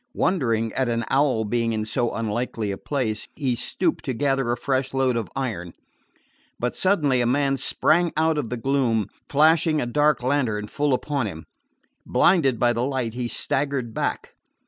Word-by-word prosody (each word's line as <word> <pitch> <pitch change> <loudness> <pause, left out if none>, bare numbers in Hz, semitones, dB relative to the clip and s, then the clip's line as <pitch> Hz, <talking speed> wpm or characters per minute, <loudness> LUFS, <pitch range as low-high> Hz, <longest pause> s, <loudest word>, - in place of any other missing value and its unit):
Wondering 115 - +1
at 130 -2 0
an 115 -1 -1
owl 135 -5 +2
being 115 +1 0
in 110 -1 -2
so 120 +2 0
unlikely 115 -1 -2
a 100 - -4
place, 115 -7 -2
he 135 -4 0
stooped 165 +7 -1
to 130 - -2
gather 135 -1 +1
a 120 - -1
fresh 135 0 -1
load 130 -2 +2
of 110 -6 -2
iron. 105 -11 -3 0.9
But 120 0 -1
suddenly 150 -10 +2
a 120 - +1
man 135 +2 +2
sprang 170 +5 +2
out 160 -1 +2
of 125 -6 -3
the 125 - -3
gloom, 115 -5 0 0.2
flashing 155 +2 +4
a - - -1
dark 145 +2 +2
lantern 125 -6 0
full 145 -2 +1
upon 140 -3 -2
him. 80 -5 -8 0.6
Blinded 150 -9 +3
by 120 0 +3
the 115 - -2
light, 130 -4 -2
he 120 0 -3
staggered 135 -2 -1
back. - - -3
130 Hz, 170 wpm, -24 LUFS, 115-145 Hz, 0.9 s, flashing